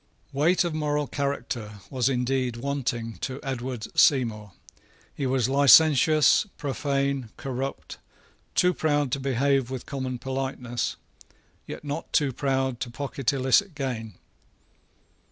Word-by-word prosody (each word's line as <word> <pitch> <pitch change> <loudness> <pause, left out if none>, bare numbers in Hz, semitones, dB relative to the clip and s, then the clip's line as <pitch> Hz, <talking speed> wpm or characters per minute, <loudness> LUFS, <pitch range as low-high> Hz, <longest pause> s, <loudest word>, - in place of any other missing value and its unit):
Weight 160 +7 +3
of 170 -2 -2
moral 150 -1 0
character 140 -6 -3 0.2
was 130 -1 +1
indeed 125 -1 0
wanting 120 -3 -3
to 130 0 -5
Edward 130 -4 -4
Seymour. 110 -7 +3 0.6
He 140 - -2
was 130 -2 +1
licentious, 145 - +6
profane, 140 -3 -1
corrupt, 135 0 -5 0.6
too 180 0 +4
proud 145 -5 0
to 140 - 0
behave 135 0 +1
with 130 -2 -5
common 130 -3 -4
politeness, 130 -2 -3 0.7
yet - - -7
not 145 +2 -5
too 140 -3 +2
proud 130 -2 -1
to 125 - -4
pocket 135 +1 -2
illicit 140 +7 +2
gain. 115 - -4
135 Hz, 120 wpm, -26 LUFS, 125-140 Hz, 0.7 s, licentious